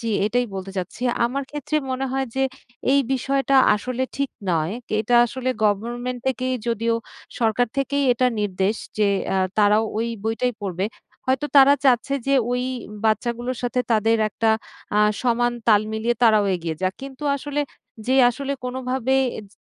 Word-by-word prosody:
জ্বি 230 - -2 0.2
এটাই 245 +3 +1
বলতে 190 0 -5
চাচ্ছি। 185 +6 -5 0.2
আমার 265 +4 -1
ক্ষেত্রে 295 +1 -2
মনে 260 +1 -1
হয় 270 0 0
যে, 270 - +2 0.5
এই 280 - +5
বিষয়টা 270 +1 +1 0.2
আসলে 250 +4 -3
ঠিক 280 0 -1 0.2
নয়, 160 +2 0 0.3
এটা 225 +3 0
আসলে 255 +2 -4 0.2
গভর্নমেন্ট 240 +4 -1
থেকেই 255 0 0
যদিও 230 0 +1 0.4
সরকার 230 +1 +2
থেকেই 280 +1 0
এটা 250 +1 +2
নির্দেশ 195 +1 0 0.2
যে 210 -1 +4 0.3
আ - - +2 0.2
তারাও 210 +1 +4
ওই 230 +1 0 0.2
বইটাই 225 +3 0
পড়বে। 190 -1 -2 0.4
হয়তো 260 +2 +1
তারা 280 +1 +8
চাচ্ছে 265 +1 +3
যে, 275 - +3 0.2
ওই 250 0 0 0.4
বাচ্চাগুলোর 240 +3 0
সাথে 245 +1 0
তাদের 225 +1 +3
একটা 220 +1 +1 0.5
আ - - +4 0.2
সমান 240 -1 +2 0.2
তাল 210 -2 +6
মিলিয়ে 230 +2 0
তারাও 215 -3 +5
এগিয়ে 165 -2 -3
যাক। 185 0 0
কিন্তু 270 +1 -9
আসলে, 290 +1 -3 0.5
যে 260 - +2 0.2
আসলে, 280 +3 -4
কোনোভাবে 255 0 -1 0.2
এজ 215 - -9
240 Hz, 155 wpm, -23 LUFS, 215-260 Hz, 0.5 s, তারা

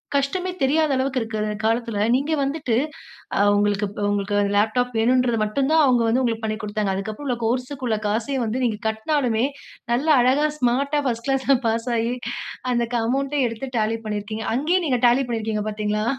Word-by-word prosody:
கஷ்டமே 320 +7 0
தெரியாத 305 +3 +2
அளவுக்கு 260 0 0
இருக்குற 215 -1 -3 0.2
காலத்துல, 230 -1 0 0.2
நீங்க 280 +4 -1
வந்துட்டு 275 -3 -1 0.6
அ - - +2 0.2
உங்களுக்கு 205 0 +1 0.2
உங்களுக்கு, 205 0 0 0.2
லேப்டாப் 235 +4 +1
வேணுன்றத 245 0 +2
மட்டும் 265 +7 0
தான் 320 -1 +5
அவுங்க 245 -3 +3
வந்து 245 +4 +2
உங்களுக்கு 225 -2 -1
பண்ணிக் 215 +1 -3
குடுத்தாங்க. 205 -2 -1
அதுக்கப்பறம் 215 +8 -5
உள்ள 250 - +1
கோர்ஸ்க்கு 255 +3 -2
உள்ள 220 -2 +1
காசயும் 235 +4 -1
வந்து 245 +4 -2
நீங்க 220 -3 -1
கட்டினாலுமே, 235 +1 0 0.5
நல்ல 275 +6 0
அழகா 275 +5 +3
ஸ்மார்ட்டா 275 +4 +1
1 230 -1 -2
கிளாஸ்ல 270 0 +3
பாஸ் 230 +2 -1
ஆயி, 230 +2 0 0.6
அந்த 240 -1 +1
க - - +3
அமவுண்ட்ட 275 +3 0
எடுத்து 230 +4 -5
Tally 225 +1 0
பண்ணியிருக்கீங்க. 215 +1 -4
அங்கேயே 340 +7 +1
நீங்க 250 -3 +1
Tally 255 +3 +3
பண்ணிருக்கீங்க 220 -2 -2
பார்த்தீங்ளா? 210 0 -1
240 Hz, 165 wpm, -23 LUFS, 220-270 Hz, 0.6 s, தான்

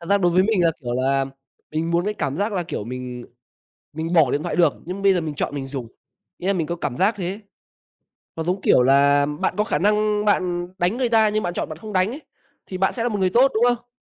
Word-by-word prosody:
thật 170 - -10
ra 200 - +5
đối 175 -3 +2
với 185 +2 +4
mình 210 -3 +1
là, 165 - +4
kiểu 120 -3 -3
là, 135 +2 +1 0.5
mình 160 +2 -1
muốn 170 +1 +1
cái 210 +1 -1
cảm 140 -7 -3
giác 205 +3 -1
là, 185 -3 -1
kiểu, 160 - -5
mình 125 0 -6 0.7
mình 160 +2 -4
bỏ 160 -7 +4
điện 145 +3 -1
thoại - - -3
được, 165 -4 +4
nhưng 185 +3 -6
bây 195 -1 +5
giờ 180 - +1
mình 155 -2 -4
chọn 145 - -3
mình 135 -2 -4
dùng, 135 -3 -5 0.5
nghĩa 180 - -6
là 195 - +3
mình 170 -5 -1
có 170 +2 -3
cảm 125 - -4
giác 200 - +2
thế 185 -4 -4
ấy. 200 +3 -7 1.0
Nó 160 - -3
giống 180 +3 -1
kiểu 125 - +4
là 140 +2 +4
bạn 150 +1 -2
có 210 - +3
khả 215 - -1
năng 210 +1 +1
bạn 180 -4 +1
đánh 180 +6 +1
người 250 -2 0
ta 220 -2 +4
nhưng 215 +1 -1
bạn 175 - -2
chọn - - -3
bạn 155 - -7
không 215 +5 -9
đánh 185 +1 +2
ấy, 285 +5 -8 0.4
thì 185 - -6
bạn 190 +1 +1
sẽ 230 - -2
là 240 - +1
một 210 -3 -2
người 185 -1 +2
tốt, 255 +7 +4
đúng 220 - +1
không? 240 0 -1
175 Hz, 275 wpm, -22 LUFS, 150-210 Hz, 1.0 s, ra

